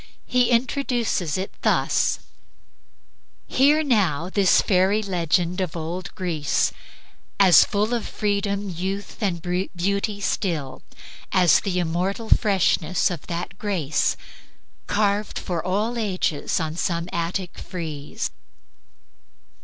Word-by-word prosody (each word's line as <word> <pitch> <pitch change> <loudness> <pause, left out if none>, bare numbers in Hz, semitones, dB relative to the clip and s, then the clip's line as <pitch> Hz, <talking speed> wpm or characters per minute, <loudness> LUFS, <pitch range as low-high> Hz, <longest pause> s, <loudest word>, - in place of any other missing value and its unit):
He 250 -1 +2
introduces 235 - 0
it 190 +1 -4
thus: - - +2 1.2
"Hear 295 +4 +3
now 185 - +1
this 195 -3 +4
fairy 195 +3 +2
legend 180 -1 0
of 175 -2 -3
old 170 +3 -4
Greece, 165 -6 0 0.7
As 190 -3 +8
full 210 +3 0
of 235 -2 -2
freedom, 200 -1 -1
youth 190 +4 -5
and 175 -5 -1 0.3
beauty 200 +3 -1
still, 165 -9 -2 0.5
As 180 -4 +5
the 185 -2 -2
immortal 180 +6 -1
freshness 185 -4 +2
of 170 -5 -6
that 170 0 -5
grace 175 - 0 0.7
Carved 205 0 0
for 175 -4 -3
all 210 +6 0
ages 185 -8 -1
on 160 -1 -3
some 170 -1 -1
Attic 175 +2 -3
frieze." 155 -5 -5
185 Hz, 105 wpm, -23 LUFS, 170-205 Hz, 1.2 s, As